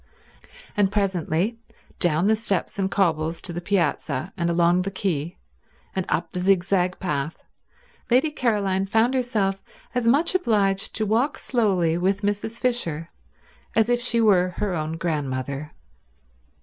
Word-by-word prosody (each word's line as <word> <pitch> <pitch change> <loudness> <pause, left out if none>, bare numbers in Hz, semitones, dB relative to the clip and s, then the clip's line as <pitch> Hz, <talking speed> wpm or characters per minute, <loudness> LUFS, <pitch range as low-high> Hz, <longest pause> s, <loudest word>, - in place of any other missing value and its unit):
And 200 -2 +2
presently, 195 +1 0 0.4
down 175 0 +3
the 220 - +4
steps 205 -2 -2
and 190 -1 +1
cobbles 165 -4 +1
to 175 - -5
the 175 - -4
piazza, 170 -4 -1
and 170 -3 -1
along 170 +1 +3
the 190 - -2
quay, 175 -4 -2 0.6
and 190 -2 -2
up 170 +1 -1
the 180 - -3
zigzag 185 -1 +2
path, 150 -3 -3 0.7
Lady 260 +6 +3
Caroline 200 -8 0
found 225 +5 +2
herself 215 -7 0 0.3
as 245 -2 0
much 290 +10 +4
obliged 205 - +1
to 220 - +1
walk 235 +8 +1
slowly 185 -9 +1
with 195 +3 0
Mrs. 205 +3 -2
Fisher 170 -11 -1 0.6
as 225 +1 +3
if 245 0 +2
she 235 -1 +1
were 185 -5 +3
her 205 -3 -1
own 155 -1 -2
grandmother. 140 -3 -3
195 Hz, 140 wpm, -24 LUFS, 170-220 Hz, 0.7 s, the